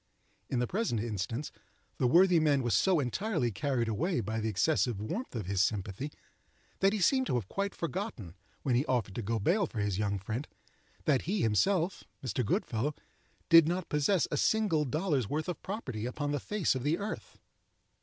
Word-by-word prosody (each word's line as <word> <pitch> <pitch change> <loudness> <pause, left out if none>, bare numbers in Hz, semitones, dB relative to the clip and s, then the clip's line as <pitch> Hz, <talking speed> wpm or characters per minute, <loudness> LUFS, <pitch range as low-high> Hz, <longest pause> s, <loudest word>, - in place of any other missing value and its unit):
In 130 - -1
the 125 - +2
present 195 - -1
instance 115 +5 -3 0.5
the 125 - +3
worthy 175 +5 +6
man 145 -4 +3
was 120 -3 0
so 180 - +4
entirely 145 - -1
carried 120 +3 -1
away 150 - 0
by 110 +1 -2
the 110 0 -1
excessive 120 - +1
warmth 175 - -4
of 110 -5 -3
his 95 0 +1
sympathy, 100 +7 -1 0.7
that 195 0 +4
he 215 - -1
seemed 260 +8 +3
to - - 0
have 115 -6 -1
quite 200 - -2
forgotten, 170 - -4 0.3
when 130 - +1
he 125 +3 +3
offered 115 -6 0
to 120 - -3
go 115 +2 -1
bail 175 - +2
for 120 - -10
his 100 -2 0
young 100 -1 0
friend, 110 +9 -4 0.6
that 140 -4 +3
he 200 -3 +1
himself 165 - +1 0.2
(Mr. 125 +1 -1
Goodfellow) 120 +6 -1 0.5
did 165 -2 +8
not 175 0 -2
possess 150 +5 +2
a 150 - 0
single 185 -5 +2
dollar's 145 - 0
worth 155 +1 -2
of 180 - -4
property 130 - -4
upon 145 +3 -3
the 145 - 0
face 210 +4 0
of 130 - -3
the 150 +6 +1
earth. 205 +1 -6
140 Hz, 185 wpm, -31 LUFS, 110-175 Hz, 0.7 s, did